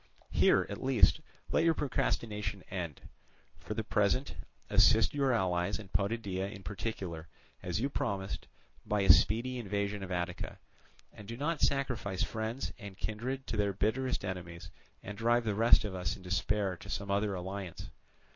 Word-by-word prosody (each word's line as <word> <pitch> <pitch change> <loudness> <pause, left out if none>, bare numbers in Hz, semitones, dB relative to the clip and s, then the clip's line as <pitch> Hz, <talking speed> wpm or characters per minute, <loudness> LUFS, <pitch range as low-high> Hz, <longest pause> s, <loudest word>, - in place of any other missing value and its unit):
"Here, - - +4
at - - -6
least, 130 -2 +4 0.3
let - - +3
your 165 -1 +4
procrastination 105 -8 -1
end. 85 -7 -4 0.6
For 105 - -5
the 110 - -1
present, 105 +5 +1 0.3
assist 110 -2 +5
your 140 -2 +2
allies 95 -3 +1
and 100 -3 -11
Potidæa 100 -2 -1
in 100 -3 -10
particular, 95 -5 -4 0.3
as - - -2
you 130 - +1
promised, 100 -9 -3 0.4
by 105 -1 0
a 95 -2 +9
speedy 120 +6 +2
invasion 100 -2 -2
of 95 -1 -6
Attica, 90 -1 -3 0.6
and 105 - -12
do 115 +1 -6
not 150 +3 -1
sacrifice 125 -9 +1
friends 110 +4 -3
and 100 -4 -9
kindred 125 +7 -3
to 110 - -3
their 100 -1 +1
bitterest 110 +4 0
enemies, 85 -3 -6 0.3
and 105 +1 -7
drive 120 +1 +3
the 110 -2 0
rest 115 +1 +5
of 100 - -4
us 90 0 -2
in 95 - -13
despair 95 +1 0
to - - -11
some 100 0 -3
other 100 0 +1
alliance. 95 0 -6
105 Hz, 160 wpm, -32 LUFS, 95-115 Hz, 0.6 s, a